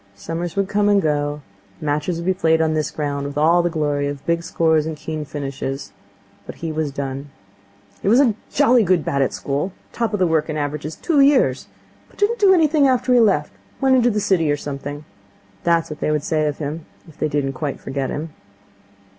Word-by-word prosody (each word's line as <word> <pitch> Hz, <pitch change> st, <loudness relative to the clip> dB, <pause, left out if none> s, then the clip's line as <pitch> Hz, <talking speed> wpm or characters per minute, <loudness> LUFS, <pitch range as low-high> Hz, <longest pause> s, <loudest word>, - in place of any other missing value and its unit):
Summers 165 Hz, +10 st, -5 dB
would 195 Hz, -1 st, +1 dB
come 205 Hz, +1 st, +2 dB
and 205 Hz, -1 st, +5 dB
go, 145 Hz, -3 st, -1 dB, 0.4 s
matches 150 Hz, +2 st, -1 dB
would 170 Hz, -, -5 dB
be 190 Hz, -, +2 dB
played 160 Hz, -3 st, +2 dB
on 160 Hz, -1 st, +2 dB
this 155 Hz, -1 st, 0 dB
ground 140 Hz, -2 st, -3 dB
with 140 Hz, 0 st, -7 dB
all 165 Hz, +4 st, +4 dB
the 175 Hz, -, 0 dB
glory 145 Hz, -3 st, -1 dB
of 145 Hz, -1 st, -6 dB
big 170 Hz, 0 st, +1 dB
scores 160 Hz, -2 st, +1 dB
and 160 Hz, -1 st, -4 dB
keen 155 Hz, 0 st, -5 dB
finishes; 135 Hz, -4 st, -5 dB, 0.6 s
but -, -, -7 dB
he 165 Hz, -1 st, -4 dB
was 155 Hz, -2 st, -2 dB
done. 135 Hz, +1 st, -5 dB, 0.7 s
'He -, -, -3 dB
was 230 Hz, +5 st, +5 dB
a 255 Hz, -6 st, +4 dB, 0.2 s
jolly 255 Hz, -4 st, +4 dB
good 180 Hz, -5 st, +2 dB
bat 140 Hz, -, 0 dB
at 135 Hz, -, +1 dB
school. 145 Hz, +7 st, -3 dB, 0.2 s
Top 230 Hz, -2 st, -1 dB
of 210 Hz, -, 0 dB
the 185 Hz, -, +4 dB
Wrykyn 160 Hz, -1 st, 0 dB
averages 150 Hz, +1 st, -3 dB
two 320 Hz, -4 st, 0 dB
years. 275 Hz, -1 st, +3 dB, 0.4 s
But -, -, -23 dB
didn't 435 Hz, +3 st, +1 dB
do 400 Hz, -2 st, +6 dB
anything 310 Hz, -5 st, +4 dB
after 255 Hz, -1 st, +2 dB
he 245 Hz, -, +6 dB
left. 190 Hz, -10 st, +2 dB, 0.3 s
Went 265 Hz, -1 st, +4 dB
into 245 Hz, -1 st, +4 dB
the 210 Hz, -2 st, 0 dB
city 185 Hz, -7 st, +2 dB
or 145 Hz, -, +1 dB
something.' 145 Hz, +1 st, -6 dB, 0.6 s
That 170 Hz, -1 st, +4 dB
was -, -, -15 dB
what 150 Hz, -, -7 dB
they -, -, -1 dB
would 150 Hz, -1 st, 0 dB
say 155 Hz, -1 st, 0 dB
of 145 Hz, -, -2 dB
him, 155 Hz, +2 st, -5 dB, 0.2 s
if 160 Hz, -, -17 dB
they -, -, +1 dB
didn't 140 Hz, -2 st, -1 dB
quite 140 Hz, +1 st, -4 dB
forget 135 Hz, 0 st, -3 dB
him. 155 Hz, +1 st, -5 dB
155 Hz, 215 wpm, -21 LUFS, 145-195 Hz, 0.7 s, do